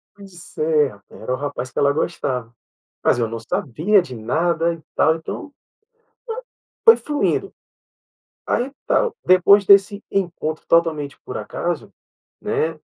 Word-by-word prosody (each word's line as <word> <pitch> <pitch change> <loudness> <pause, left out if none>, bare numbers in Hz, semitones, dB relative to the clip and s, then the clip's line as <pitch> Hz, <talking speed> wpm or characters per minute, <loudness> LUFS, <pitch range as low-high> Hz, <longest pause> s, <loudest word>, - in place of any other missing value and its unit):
Pois 195 -4 -13
é, 155 -2 +3
rapaz, 100 -1 -15
era 125 - -2
o - - +1
rapaz 130 -3 -5
que - - -3
ela 140 0 +4
gostava. 125 -7 -2 0.5
Mas - - +3
eu 115 -2 0
não 115 - -5
sabia 170 - +1
de 160 -8 -8
nada 165 +9 0
e 165 - -13
tal, 160 - +3
então, 165 - -6
eh, 285 - -29 1.3
foi 455 0 +9
fluindo. 295 -1 -1 0.9
Aí 250 +3 0 0.2
tal. 480 -3 +1
Depois 185 +3 +6
desse 200 +1 +5
encontro 170 -5 -2
totalmente 160 -4 +1
por 125 - -6
acaso, 140 +5 -4 0.5
né, 160 0 -1
160 Hz, 140 wpm, -21 LUFS, 135-190 Hz, 1.3 s, foi